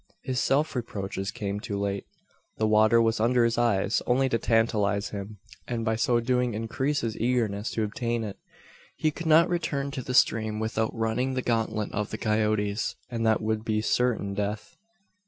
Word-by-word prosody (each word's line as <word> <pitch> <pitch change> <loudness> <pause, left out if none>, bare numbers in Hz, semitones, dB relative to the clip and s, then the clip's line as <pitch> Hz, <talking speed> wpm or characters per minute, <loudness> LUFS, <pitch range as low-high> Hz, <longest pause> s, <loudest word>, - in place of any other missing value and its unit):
His 130 -1 -1
self 145 +4 +1
reproaches 100 -5 -4
came 100 -1 -3
too 105 -1 -4
late. 100 -1 -2 0.5
The 110 - +1
water 110 +2 +5
was 115 -1 +2
under 120 +2 +3
his 115 0 +1
eyes, 105 -3 +2
only 130 +2 +3
to 115 - +1
tantalise 105 -3 +1
him; 100 +1 -7 0.3
and 115 -2 -2
by 110 -1 +1
so 120 +1 +2
doing 125 -1 0
increase 120 +6 -1
his 115 -2 -2
eagerness 115 -3 0
to 110 - 0
obtain 115 +2 -2
it. 100 -2 -6 0.6
He 155 - +1
could 165 +2 -6
not 160 +2 +6
return 140 -6 -2
to 135 - -4
the 125 0 -4
stream, 110 -3 +3
without 110 0 -1
running 115 +4 -1
the 130 - -1
gauntlet 110 -2 -1
of 105 0 -2
the 110 - -4
coyotes, 105 -1 0 0.2
and 115 -1 -2
that 110 -1 +3
would 110 0 -1
be 110 -1 0
certain 110 -2 0
death. 105 +11 -4
110 Hz, 180 wpm, -27 LUFS, 105-125 Hz, 0.6 s, not